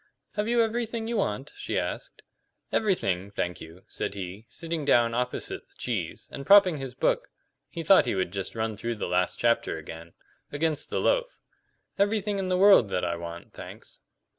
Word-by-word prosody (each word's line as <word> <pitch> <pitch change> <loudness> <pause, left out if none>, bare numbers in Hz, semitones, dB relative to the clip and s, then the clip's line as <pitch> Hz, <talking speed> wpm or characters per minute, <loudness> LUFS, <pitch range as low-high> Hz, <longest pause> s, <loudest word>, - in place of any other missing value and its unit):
"Have 210 +1 -2
you 235 0 +4
everything 225 0 -2
you 235 0 -1
want?" - - -1
she - - -3
asked. - - -4 0.5
"Everything, 100 - 0
thank 90 -3 -3
you," 80 +3 -11
said - - -4
he, 100 +3 -7
sitting 165 +1 -4
down 120 -4 +4
opposite 125 +1 -3
the - - -31
cheese, - - -3
and 140 - -6
propping 195 -2 +7
his 135 -2 -6
book - - +1 0.4
(he 165 - -5
thought 190 -4 +6
he 120 - 0
would 95 -2 -1
just 95 +1 -4
run 110 -1 -2
through 115 +3 -3
the 105 - -3
last 90 +1 +1
chapter 115 -7 +1
again) 80 +1 -9 0.4
against 150 0 -1
the - - -1
loaf; - - +1 0.6
"everything 205 0 +1
in 190 -1 -2
the 185 - +2
world 195 - +7
that 90 - -1
I 85 -1 -1
want, 85 0 -8
thanks." - - -11
125 Hz, 180 wpm, -27 LUFS, -, 0.6 s, propping